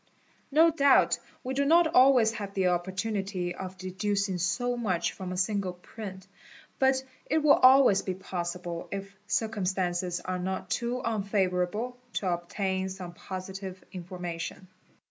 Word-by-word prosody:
_ - - -40 0.5
No 320 +3 +5
doubt 280 -3 +4 0.2
we 260 - -3
do 280 +1 +1
not 335 +4 +5
always 255 -6 +5
have 205 -3 -6
the 190 -2 +3
opportunity 190 0 -2
of 185 +1 -7
deducing 190 0 -1
so 245 +9 0
much 185 -8 0
from 185 -1 -6
a 185 - -4
single 195 -1 0
print, 190 +1 -9 0.5
but 265 0 +3 0.2
it 315 - +1
will 295 - +7
always 255 -6 +7
be 185 - -3
possible, 175 -2 -5
if 195 0 -6
circumstances 185 -5 -1
are 185 0 -3
10t 190 +1 -3
too 245 +1 -1
unfavourable, 200 +2 0 0.2
to 185 -3 0
obtain 190 +2 -2
some 185 -2 -7
positive 190 +1 -7
imformation. 180 0 -6
190 Hz, 140 wpm, -29 LUFS, 180-225 Hz, 0.5 s, will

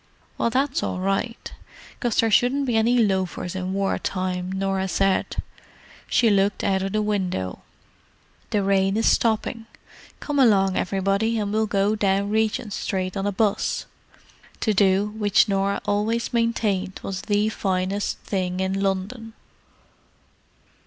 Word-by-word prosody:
"Well, - - 0
that's 270 +5 0
all - - -2
right, 195 +5 -2 0.5
'cause 240 -3 -1
there 225 -1 +3
shouldn't 255 +6 +3
be 245 -3 0
any 230 +3 +3
loafers 190 -5 0
in 185 0 -3
war 195 0 0
time," 185 -1 -3
Norah 190 0 -1
said. 195 +1 +1 0.7
She 230 -3 +3
looked 200 0 +1
out 190 -1 +1
of 195 0 -2
the 215 0 +1
window. 185 - -2 0.9
"The 205 -2 +1
rain 195 +1 +2
is 225 - +1
stopping; 225 0 +1 0.5
come 290 -1 -2
along, 195 -7 +4
everybody, 200 +4 0
and 205 -1 -2
we'll 220 0 +1
go 200 +1 +1
down 200 -1 +1
Regent 220 -1 0
Street 185 -2 -2
on 195 0 -1
a - - +1
'bus." 205 +1 0 0.8
To 215 - +2
do 195 0 +3
which 210 0 +2
Norah 200 0 0
always 220 +4 0
maintained 215 -5 0
was 195 -1 -4
the 210 0 +1
finest 195 -1 -1
thing 185 -2 -2
in 190 +1 -1
London. 200 +4 -2
200 Hz, 140 wpm, -23 LUFS, 190-220 Hz, 0.9 s, along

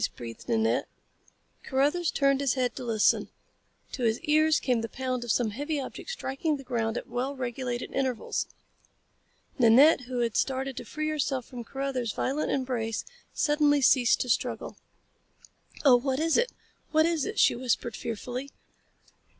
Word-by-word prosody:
breathed 115 - -9
Nanette. 225 -1 +1 0.7
Carruthers 295 +6 +1
turned 275 0 +2
his 275 -2 +1
head 255 -2 0
to 260 - -6
listen. 225 -3 +2 0.6
To 260 - -6
his 225 -1 +2
ears 310 +1 +3
came 245 -3 +1
the 225 - -4
pound 255 -2 -3
of 240 - -8
some 230 -2 +1
heavy 290 +6 -3
object 270 - -7
striking 305 - -2
the 275 - -10
ground 235 -3 -1
at - - -5
well 255 +4 -3
regulated 245 -1 -4
intervals. 260 -3 -1 1.1
Nanette, 255 +6 +6
who 250 -1 -2
had 230 -2 -1
started 265 0 -1
to - - -6
free 310 +6 -3
herself 270 -4 -1
from 245 -3 -8
Carruthers 265 -3 -3
violent 280 +4 -1
embrace, 245 -5 -2 0.3
suddenly 295 -1 +3
ceased 250 -2 +4
to 250 - -3
struggle. - - -1 1.1
"Oh, 255 -3 +8
what 265 +2 -1
is 325 +1 +2
it? 485 +1 +2 0.4
What 315 0 +4
is 330 -3 +1
it?" - - -4
she - - +5
whispered 240 -2 -1
fearfully. 245 +4 -5
260 Hz, 155 wpm, -28 LUFS, 240-285 Hz, 1.1 s, Oh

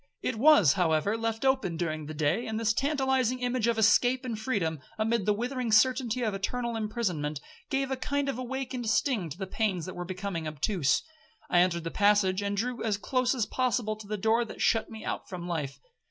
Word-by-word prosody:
It 255 - -1
was, 260 - +6
however, 175 +2 +1
left 225 +2 -2
open 265 -11 +1
during 155 -3 -3
the 155 - -6
day; 155 +9 0
and 220 0 -2
this 220 -1 +2
tantalizing 265 -2 +1
image 250 -2 0
of 235 -1 +1
escape 245 +4 +3
and 230 -4 -3
freedom, 190 - -1 0.2
amid 220 -1 0
the - - +5
withering 245 +2 -2
certainty 250 +1 +3
of 215 -3 0
eternal 235 +4 -2
imprisonment, 190 - -2 0.3
gave 270 0 -1
a - - +1
kind 285 +2 -2
of 270 -3 -2
awakened 255 -2 -3
sting 215 - +1
to 150 - -8
the 190 - -4
pains 190 -4 -1
that 185 - -7
were 175 - -4
becoming 180 -2 -4
obtuse. 150 0 +1 0.5
I 175 - +5
entered 175 -2 +2
the 165 - -4
passage, 205 -2 +3
and 200 0 -2
drew 245 +3 -2
as 215 -3 0
close 255 +4 0
as 235 -5 0
possible 245 -4 0
to 215 -1 -11
the 210 +1 -3
door 220 +4 +2
that 230 - -9
shut 225 -1 +2
me 220 -1 -9
out - - -4
from 175 -3 -6
life. 150 -6 -3
220 Hz, 205 wpm, -29 LUFS, 185-250 Hz, 0.5 s, was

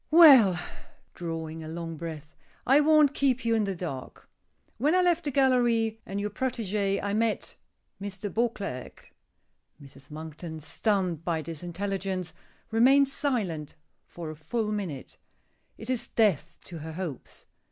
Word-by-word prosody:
Well," 270 - +8 0.5
drawing 165 -2 -5
a - - -7
long 165 0 -5
breath, 155 -2 -7 0.3
"I 270 +3 +6
won't 300 -1 +5
keep 260 -4 +1
you 230 - +2
in 220 -2 +2
the 195 -1 -2
dark. 160 -7 -7 0.5
When 300 +8 +3
I 365 - +5
left 345 -2 +2
the - - 0
gallery, 240 -5 +2
and 195 +1 -3
your 205 +1 -2
protégé, 210 -6 -1
I 200 0 -1
met 220 0 -1 0.5
Mr. 200 0 -5
Beauclerk!" 215 - -3 0.7
Mrs. 140 -1 -14
Monkton, 160 +1 -7
stunned 175 +2 -1
by 165 -2 -1
this 165 -2 -7
intelligence, 190 0 -3 0.4
remains 270 +4 +5
silent 185 - -2 0.3
for 165 -2 -7
a - - -9
full 210 +8 -2
minute. 185 -11 -5 0.6
It 220 - -9
is 255 -2 -2
death 175 -8 +1
to 170 -3 -9
her 160 +1 -7
hopes. 165 -6 -7
195 Hz, 140 wpm, -28 LUFS, 160-235 Hz, 0.7 s, Well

